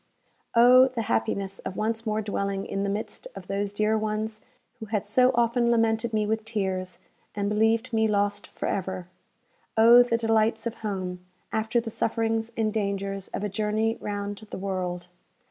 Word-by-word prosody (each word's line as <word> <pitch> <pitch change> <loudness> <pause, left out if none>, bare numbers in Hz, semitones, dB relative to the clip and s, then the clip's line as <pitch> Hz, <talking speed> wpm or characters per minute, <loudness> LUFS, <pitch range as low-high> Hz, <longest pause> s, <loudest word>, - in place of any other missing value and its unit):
Oh, 250 +2 +8
the 245 -3 -3
happiness 190 - -1
of 190 - -6
once 225 +1 -1
more 215 0 0
dwelling 200 -1 -2
in 195 - -3
the 200 - 0
midst 210 - -4
of - - -8
those 200 0 -2
dear 215 +1 +1
ones 215 0 -2 0.4
who 220 - -7
had 210 -1 -1
so 250 +5 +4
often 235 0 +2
lamented 225 0 +2
me 215 -1 +1
with 220 +1 -1
tears, 190 -5 -3 0.4
and 200 -1 -1
believed 225 +3 +1
me 220 0 +3
lost 205 -1 0
for - - -6
ever! 185 -2 -3 0.7
Oh, 235 +2 +8
the 240 -1 +2
delights 225 0 +1
of 235 - -2
home, 185 -4 -4 0.3
after 220 +2 +1
the 230 -1 -5
sufferings 225 0 0
and 215 -2 0
dangers 200 -2 -2
of - - -5
a - - 0
journey 215 +2 0
round 205 0 -4
the - - -6
world! 185 -2 -3
215 Hz, 170 wpm, -26 LUFS, 200-225 Hz, 0.7 s, Oh